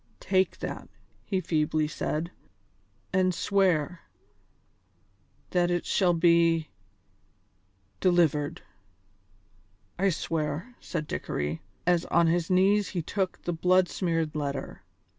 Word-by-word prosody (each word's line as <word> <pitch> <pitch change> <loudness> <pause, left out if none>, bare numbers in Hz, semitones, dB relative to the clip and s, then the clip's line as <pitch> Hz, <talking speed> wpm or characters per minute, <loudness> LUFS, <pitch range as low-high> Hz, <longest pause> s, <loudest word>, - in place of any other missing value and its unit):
"Take 190 0 +1
that," - - -5 0.4
he 190 - 0
feebly 155 -2 0
said, 155 +2 -3 0.8
"and 185 -1 +2
swear... 180 -5 +1 1.5
that 175 -1 +2
it 175 -1 -1
shall 180 -3 +2
be... 165 -2 +3 1.3
delivered." 160 -5 +2 1.4
"I 195 +1 +3
swear," 165 +5 -3
said 160 -3 -4
Dickory, 75 - -3 0.2
as 175 -1 +2
on 170 0 +3
his 165 0 +1
knees 195 +2 +3
he 175 -4 -3
took 190 +3 -3
the 175 - -2
blood 180 +2 +3
smeared 165 -4 -1
letter. 140 -9 -4
170 Hz, 105 wpm, -28 LUFS, 155-185 Hz, 1.5 s, be